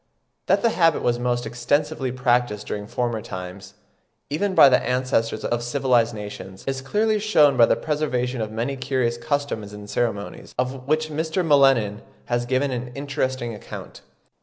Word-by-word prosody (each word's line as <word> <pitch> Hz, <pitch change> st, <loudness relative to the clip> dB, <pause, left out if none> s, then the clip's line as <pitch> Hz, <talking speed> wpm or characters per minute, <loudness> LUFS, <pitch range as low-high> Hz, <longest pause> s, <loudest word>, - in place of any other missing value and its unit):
That -, -, +3 dB
the 230 Hz, -, +4 dB
habit 165 Hz, -5 st, +2 dB
was 120 Hz, 0 st, +1 dB
most 120 Hz, 0 st, -1 dB
extensively 145 Hz, +2 st, -1 dB
practised 120 Hz, -4 st, +1 dB
during 105 Hz, 0 st, -5 dB
former 120 Hz, -1 st, -2 dB
times, 90 Hz, -1 st, -8 dB, 0.6 s
even 190 Hz, +6 st, 0 dB
by 140 Hz, -, +9 dB
the 125 Hz, -2 st, +4 dB
ancestors 125 Hz, -3 st, 0 dB
of 120 Hz, 0 st, 0 dB
civilised 120 Hz, -2 st, +1 dB
nations, 100 Hz, -2 st, -8 dB
is 135 Hz, -1 st, -2 dB
clearly 215 Hz, +9 st, +1 dB
shewn 155 Hz, -10 st, +4 dB
by 120 Hz, -2 st, +6 dB
the -, -, +3 dB
preservation 130 Hz, -5 st, -1 dB
of 110 Hz, -, -2 dB
many 120 Hz, +5 st, -2 dB
curious 130 Hz, -3 st, -1 dB
customs 140 Hz, -8 st, -2 dB
and 105 Hz, 0 st, -9 dB
ceremonies, 105 Hz, -2 st, -3 dB
of 130 Hz, +1 st, -3 dB
which 155 Hz, +1 st, +1 dB
Mr. 160 Hz, +4 st, -1 dB
M'Lennan 135 Hz, -9 st, +4 dB, 0.2 s
has 120 Hz, 0 st, -1 dB
given 130 Hz, +2 st, +1 dB
an 125 Hz, 0 st, -3 dB
interesting 130 Hz, -3 st, -2 dB
account. 105 Hz, -, -9 dB
125 Hz, 160 wpm, -23 LUFS, 115-145 Hz, 0.6 s, by